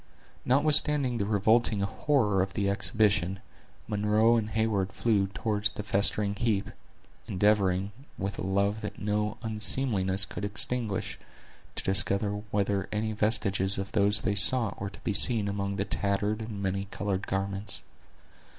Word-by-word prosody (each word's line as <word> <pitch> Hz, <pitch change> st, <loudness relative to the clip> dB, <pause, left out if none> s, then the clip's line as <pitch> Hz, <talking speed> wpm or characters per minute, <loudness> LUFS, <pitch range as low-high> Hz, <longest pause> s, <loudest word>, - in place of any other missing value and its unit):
Notwithstanding 145 Hz, -2 st, +4 dB
the 100 Hz, -, -2 dB
revolting 110 Hz, +1 st, +2 dB
horror 105 Hz, -1 st, 0 dB
of 95 Hz, +1 st, -4 dB
the 100 Hz, -2 st, -1 dB
exhibition, 100 Hz, -1 st, 0 dB, 0.5 s
Munro 105 Hz, +2 st, +2 dB
and 110 Hz, -2 st, -1 dB
Heyward 110 Hz, -4 st, -1 dB
flew 105 Hz, -4 st, 0 dB
toward 105 Hz, +1 st, -2 dB
the 105 Hz, -, -5 dB
festering 100 Hz, 0 st, 0 dB
heap, 100 Hz, -2 st, -2 dB, 0.6 s
endeavoring, 100 Hz, -1 st, +1 dB, 0.3 s
with 95 Hz, +1 st, -5 dB
a -, -, -3 dB
love 100 Hz, +3 st, -1 dB
that 105 Hz, -, -7 dB
no 105 Hz, 0 st, -2 dB
unseemliness 105 Hz, -3 st, +2 dB
could 105 Hz, -, -8 dB
extinguish, 105 Hz, +1 st, -1 dB, 0.6 s
to -, -, -4 dB
discover 100 Hz, +1 st, +2 dB, 0.2 s
whether 100 Hz, -1 st, -1 dB
any 110 Hz, +1 st, -2 dB
vestiges 100 Hz, -3 st, 0 dB
of 95 Hz, 0 st, -5 dB
those 105 Hz, +1 st, +3 dB
they 100 Hz, -, -1 dB
sought 110 Hz, +3 st, +4 dB
were 100 Hz, -, -3 dB
to 100 Hz, -, -15 dB
be 105 Hz, -, -2 dB
seen 110 Hz, -1 st, +4 dB
among 100 Hz, 0 st, -3 dB
the 100 Hz, -, -2 dB
tattered 105 Hz, +2 st, -1 dB
and 110 Hz, -3 st, -6 dB
many 95 Hz, +1 st, -2 dB
colored 100 Hz, -1 st, -4 dB
garments. 100 Hz, +1 st, -3 dB
100 Hz, 140 wpm, -27 LUFS, 100-110 Hz, 0.6 s, Notwithstanding